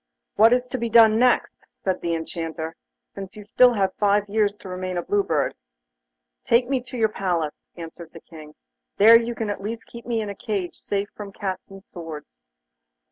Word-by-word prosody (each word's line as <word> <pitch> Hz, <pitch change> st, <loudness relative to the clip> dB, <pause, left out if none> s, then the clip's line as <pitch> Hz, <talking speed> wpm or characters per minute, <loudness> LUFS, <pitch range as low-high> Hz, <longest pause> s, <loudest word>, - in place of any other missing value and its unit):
'What 220 Hz, +2 st, +6 dB
is 250 Hz, 0 st, +2 dB
to 255 Hz, -, -3 dB
be 235 Hz, 0 st, -2 dB
done 225 Hz, -1 st, +6 dB
next?' 250 Hz, 0 st, +2 dB, 0.2 s
said 190 Hz, -1 st, -1 dB
the 170 Hz, -1 st, -1 dB
Enchanter, 165 Hz, 0 st, -5 dB, 0.4 s
'since 195 Hz, 0 st, -8 dB
you 210 Hz, -1 st, -10 dB
still 245 Hz, +3 st, +5 dB
have 195 Hz, -2 st, +1 dB
five 205 Hz, 0 st, +2 dB
years 205 Hz, 0 st, +1 dB
to -, -, -12 dB
remain 185 Hz, 0 st, -4 dB
a 175 Hz, -, -2 dB
Blue 205 Hz, +3 st, +1 dB
Bird.' 160 Hz, -6 st, 0 dB, 0.9 s
'Take 240 Hz, +1 st, +3 dB
me 265 Hz, -1 st, 0 dB
to 250 Hz, 0 st, -9 dB
your 225 Hz, -2 st, +3 dB
palace,' 175 Hz, -7 st, -3 dB
answered 165 Hz, 0 st, -9 dB
the 165 Hz, -, -12 dB
King; 155 Hz, -2 st, -13 dB, 0.4 s
'there 230 Hz, +3 st, +8 dB
you 235 Hz, 0 st, -4 dB
can 220 Hz, -2 st, -2 dB
at 200 Hz, -, -5 dB
least 225 Hz, +3 st, -5 dB
keep 235 Hz, 0 st, -12 dB
me 235 Hz, -2 st, 0 dB
in 215 Hz, -2 st, -3 dB
a -, -, -5 dB
cage 195 Hz, -4 st, -3 dB
safe 200 Hz, 0 st, -3 dB
from 205 Hz, -1 st, -8 dB
cats 195 Hz, -1 st, -5 dB
and 195 Hz, 0 st, -12 dB
swords. 160 Hz, -, -10 dB
200 Hz, 195 wpm, -23 LUFS, 175-225 Hz, 0.9 s, there